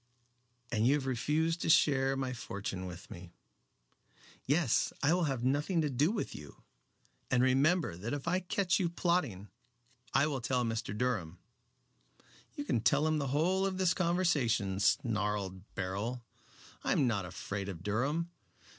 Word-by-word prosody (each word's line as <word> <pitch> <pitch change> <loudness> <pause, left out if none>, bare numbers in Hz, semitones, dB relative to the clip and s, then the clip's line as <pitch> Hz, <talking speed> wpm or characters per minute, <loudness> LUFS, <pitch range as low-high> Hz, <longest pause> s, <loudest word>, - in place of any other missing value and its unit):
"And 110 -1 +2
you 140 - +5
have 145 -3 -2
refused 155 +6 0
to - - -1
share 135 -3 +4
my 130 -1 -2
fortune 100 -5 -5
with 90 0 -10
me." 85 0 -10 1.1
"Yes. 145 -2 +2
I 145 +4 +4
will 175 -1 +2
have 135 -5 -2
nothing 145 +7 +1
to 150 -2 0
do 140 +6 +2
with 215 - -3
you. 75 -1 -11 0.7
And 125 -1 +3
remember 140 - +3
that 105 +7 -5
if 145 +2 -4
I 180 +2 +2
catch 185 0 0
you 175 -3 +1
plotting 165 - -1 0.6
I 140 - +4
will 140 -4 -2
tell 125 +1 0
Mr. 115 -2 -3
Durham." 105 -9 -1 1.2
"You 145 - -4
can 125 -6 0
tell 140 +8 +3
him 155 -1 +1
the 140 - -1
whole 170 +8 +1
of 195 -1 -1
this 185 -1 +3
conversation," 150 - +1
snarled 105 -3 0
Beryl. 105 +6 -3 0.6
"I - - +2
am 140 - +3
not 105 -6 0
afraid 100 +2 -5
of 85 -3 -7
Durham. 140 - -1
130 Hz, 155 wpm, -32 LUFS, 105-160 Hz, 1.2 s, you